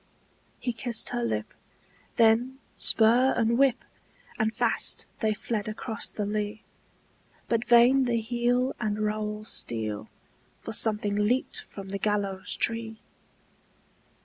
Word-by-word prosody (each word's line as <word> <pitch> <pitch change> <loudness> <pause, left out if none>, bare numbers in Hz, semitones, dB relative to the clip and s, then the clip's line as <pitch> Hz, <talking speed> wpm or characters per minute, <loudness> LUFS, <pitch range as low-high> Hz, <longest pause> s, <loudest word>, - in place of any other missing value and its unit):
He 245 - -3
kissed 230 0 0
her 120 - -2
lip; 110 -2 -3 0.6
then 230 +4 +3 0.2
spur 240 +4 +4
and 230 0 +2
whip! 265 -1 +2 0.5
And 220 -1 +1
fast 230 +1 +2
they 220 -2 +1
fled 215 -1 -4
across 215 +1 -3
the 210 - -4
lea! 210 +1 -3 0.8
But 230 0 0
vain 245 +3 +5
the 235 -2 0
heel 245 +3 0
and 210 -2 -2
rowel 210 0 -2
steel, 110 - -3 0.5
For 225 - -6
something 210 -2 +3
leaped 210 +5 0
from 195 -1 -11
the 200 0 -4
gallows 200 -2 -1
tree! 225 -1 0
220 Hz, 120 wpm, -27 LUFS, 210-240 Hz, 0.8 s, vain